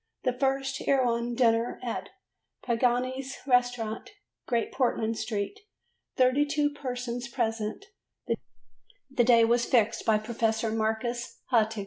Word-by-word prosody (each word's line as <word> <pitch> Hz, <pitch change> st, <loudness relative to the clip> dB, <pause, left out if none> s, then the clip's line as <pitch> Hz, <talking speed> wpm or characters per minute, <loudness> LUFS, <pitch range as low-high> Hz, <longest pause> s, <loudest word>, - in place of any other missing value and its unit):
The 255 Hz, -, +1 dB
first 270 Hz, +1 st, -1 dB
Erewhon 240 Hz, -3 st, +2 dB
dinner 230 Hz, -1 st, +2 dB
at 240 Hz, -, -4 dB, 0.5 s
Pagani's 255 Hz, +3 st, 0 dB
Restaurant, 245 Hz, -, +1 dB, 0.4 s
Great 235 Hz, -3 st, 0 dB
Portland 230 Hz, -3 st, 0 dB
Street; 220 Hz, -, -3 dB, 0.6 s
32 290 Hz, +3 st, +3 dB
persons 250 Hz, -3 st, -4 dB
present: 225 Hz, -, -2 dB, 1.3 s
the 250 Hz, -2 st, +3 dB
day 230 Hz, -1 st, +6 dB
was 235 Hz, +1 st, +2 dB
fixed 230 Hz, -4 st, +2 dB
by 220 Hz, -1 st, +4 dB
Professor 225 Hz, 0 st, -1 dB
Marcus 225 Hz, +2 st, -2 dB
Hartog. 220 Hz, -2 st, +3 dB
240 Hz, 105 wpm, -28 LUFS, 225-255 Hz, 1.3 s, day